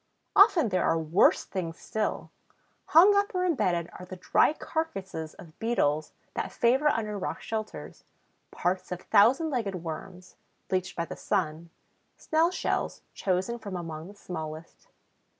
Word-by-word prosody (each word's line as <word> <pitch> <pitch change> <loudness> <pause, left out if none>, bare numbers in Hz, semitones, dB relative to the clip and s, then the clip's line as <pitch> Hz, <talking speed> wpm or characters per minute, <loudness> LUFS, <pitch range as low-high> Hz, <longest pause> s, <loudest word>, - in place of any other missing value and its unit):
Often 370 - +6
there 185 -2 +1
are 165 - +2
worse 160 +4 +3
things 170 -4 -5
still: 215 -1 -3 0.5
hung 375 +6 +7
up 405 -1 +1
or 365 0 +1
embedded 185 - +1
are - - -8
the 185 - -7
dry 180 - +3
carcasses 195 - -4
of 160 -3 -14
Beetles 155 -10 0 0.2
that - - -3
favor 260 +5 +3
under 215 -7 0
rock - - -3
shelters; 215 -1 -5 0.5
parts 185 +1 -2
of 180 0 -4
Thousand 255 +10 +4
legged 225 -7 -1
Worms, 180 +3 -8 0.3
bleached 185 0 -1
by 170 - -1
the - - -7
sun; 170 -4 -2 0.5
snail 320 +2 +2
shells, 365 - -2
chosen 190 +5 -1
from 200 -4 -6
among 165 -2 -6
the 205 - -12
smallest. 160 -4 -8
190 Hz, 145 wpm, -28 LUFS, 170-240 Hz, 0.5 s, hung